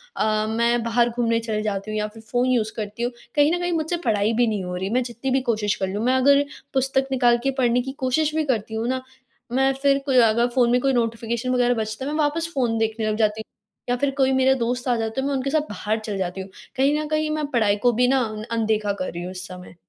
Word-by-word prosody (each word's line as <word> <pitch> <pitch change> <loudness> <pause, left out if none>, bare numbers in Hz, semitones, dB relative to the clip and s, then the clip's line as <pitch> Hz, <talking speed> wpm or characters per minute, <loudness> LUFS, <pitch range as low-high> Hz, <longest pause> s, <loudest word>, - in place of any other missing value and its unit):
अ, 215 0 +1
मैं 235 +1 +1
बाहर 235 +1 +2
घूमने 230 -1 0
चली 220 -2 -2
जाती 205 0 -3
हूँ 215 - -2
या 210 0 -1
फिर 225 - -12
फ़ोन 245 +3 0
यूज़ 230 -4 +1
करती 215 +2 -5
हूँ, 245 - 0 0.2
कहीं 295 +1 +4
न - - -3
कहीं 350 0 -1
मुझसे 325 +1 -1
पढ़ाई 215 0 +2
भी 240 +1 +2
नहीं 210 -3 -1
हो 180 0 -4
रही, 190 +2 -3
मैं 250 +2 +1
जितनी 240 +2 -4
भी 265 - +2
कोशिश 215 -4 0
कर 190 -4 -2
लूँ। 205 +4 -3
मैं 255 +1 +3
अगर 280 +2 +5 0.3
पुस्तक 265 0 +1
निकाल 245 -2 +4
के 275 - +1
पढ़ने 245 0 +3
की 265 - -5
कोशिश 295 +4 +1
भी 315 - +1
करती 220 -5 -1
हूँ 225 +2 -2
ना, 260 0 -1 0.5
मैं 270 +2 +3
फिर 280 -1 +3
कोई 265 -2 +2
अगर 235 +2 +2
फ़ोन 240 -2 +4
में 250 - +4
कोई 270 -1 +2
नोटिफ़िकेशन 230 +1 -1
वगैरह 245 0 +3
बजता 220 +3 -3
है 290 - -3
मैं 305 - -2
वापस 320 +3 0
फ़ोन 235 -4 +1
देखने 220 0 -1
लग 215 - 0
जाती 215 0 +1
हूँ - - -15 0.4
या 245 - +2
फिर 275 +2 0
कोई 265 -1 +3
मेरा 265 0 +4
दोस्त 250 0 -2
आ 245 - +3
जाते 225 +3 -2
है 275 - -1
मैं 285 - -1
उनके 270 +1 -1
साथ 310 +1 +2
बाहर 215 +2 -2
चली 215 -2 -5
जाती 185 0 -3
हूँ। 190 - -9 0.3
कहीं 280 +3 +2
न 305 - -3
कहीं 310 0 0
मैं 305 -1 -1
पढ़ाई 215 -5 +3
को 245 - +6
भी 245 +2 +3
ना 265 +1 +3 0.3
अनदेखा 215 -3 0
कर 185 - -3
रही 170 +1 -6
हूँ 180 - -5
इस 185 0 -7
समय। 180 -1 -11
240 Hz, 265 wpm, -23 LUFS, 215-265 Hz, 0.5 s, को